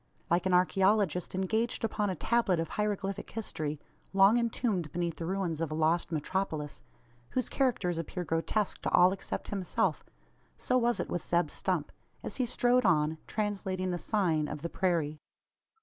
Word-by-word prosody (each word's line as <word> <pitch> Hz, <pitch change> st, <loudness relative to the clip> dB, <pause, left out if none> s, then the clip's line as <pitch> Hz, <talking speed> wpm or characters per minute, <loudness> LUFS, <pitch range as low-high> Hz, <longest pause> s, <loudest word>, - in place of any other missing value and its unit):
Like 175 Hz, +2 st, +3 dB
an 185 Hz, -, +1 dB
archaeologist 190 Hz, -1 st, +2 dB
engaged 220 Hz, +6 st, 0 dB
upon 210 Hz, -2 st, 0 dB
a 185 Hz, -, -1 dB
tablet 210 Hz, -2 st, +1 dB
of 165 Hz, -1 st, -2 dB
hieroglyphic 205 Hz, -2 st, -2 dB
history, 155 Hz, -9 st, -4 dB, 0.3 s
long 195 Hz, +4 st, +6 dB
entombed 220 Hz, -, -1 dB
beneath 170 Hz, 0 st, -2 dB
the 165 Hz, -, -4 dB
ruins 180 Hz, -4 st, -1 dB
of 165 Hz, -, -1 dB
a 155 Hz, -, -3 dB
lost 160 Hz, +2 st, +1 dB
metropolis 155 Hz, -2 st, -2 dB, 0.5 s
whose 255 Hz, -2 st, -1 dB
characters 205 Hz, -11 st, 0 dB
appear 180 Hz, +2 st, -4 dB
grotesque 175 Hz, +5 st, -1 dB
to -, -, -1 dB
all 180 Hz, +1 st, +6 dB
except 195 Hz, -, -5 dB
himself 195 Hz, -3 st, 0 dB, 0.5 s
so 255 Hz, -, 0 dB
was 240 Hz, -1 st, +2 dB
it -, -, -1 dB
with 175 Hz, -, -1 dB
Zeb 175 Hz, 0 st, +1 dB
Stump, -, -, -1 dB, 0.3 s
as -, -, -4 dB
he 255 Hz, -2 st, +1 dB
strode 245 Hz, +1 st, +3 dB
on, 155 Hz, -4 st, +2 dB
translating 190 Hz, -3 st, -2 dB
the 175 Hz, -, -2 dB
"sign" 165 Hz, -9 st, +1 dB
of 150 Hz, 0 st, -6 dB
the 170 Hz, -, -2 dB
prairie. 165 Hz, -6 st, 0 dB
185 Hz, 165 wpm, -30 LUFS, 165-210 Hz, 0.5 s, long